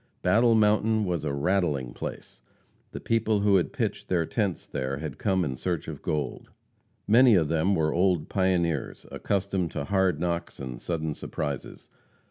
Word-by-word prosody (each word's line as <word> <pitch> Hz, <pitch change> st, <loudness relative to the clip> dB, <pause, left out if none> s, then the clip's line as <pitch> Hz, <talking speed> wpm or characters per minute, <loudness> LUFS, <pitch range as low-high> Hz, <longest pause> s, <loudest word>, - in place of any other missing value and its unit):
Battle 115 Hz, +5 st, +4 dB
Mountain 110 Hz, 0 st, +3 dB
was 90 Hz, -4 st, -2 dB
"a 75 Hz, -, -1 dB
rattling 70 Hz, -4 st, 0 dB
place;" -, -, -7 dB, 0.5 s
the -, -, -6 dB
people 110 Hz, -2 st, +1 dB
who 100 Hz, -1 st, +4 dB
had 90 Hz, -, 0 dB
pitched -, -, -3 dB
their 85 Hz, -3 st, +1 dB
tents 100 Hz, -1 st, -2 dB
there 65 Hz, -1 st, -3 dB
had 80 Hz, +1 st, -6 dB
come 95 Hz, -4 st, +1 dB
in 65 Hz, -3 st, -3 dB
search 85 Hz, +4 st, -3 dB
of -, -, -7 dB
gold. 75 Hz, -4 st, -3 dB, 0.6 s
Many 120 Hz, +1 st, +6 dB
of 80 Hz, -5 st, +2 dB
them 85 Hz, +5 st, +2 dB
were 80 Hz, -3 st, +1 dB
old 90 Hz, -3 st, +2 dB
pioneers, 90 Hz, -6 st, 0 dB
accustomed 95 Hz, -3 st, -1 dB
to -, -, -2 dB
hard 95 Hz, -4 st, +1 dB
knocks 85 Hz, 0 st, -3 dB
and 65 Hz, -3 st, -6 dB
sudden 80 Hz, -3 st, -2 dB
surprises. 70 Hz, -1 st, -6 dB
90 Hz, 160 wpm, -27 LUFS, 75-100 Hz, 0.6 s, Many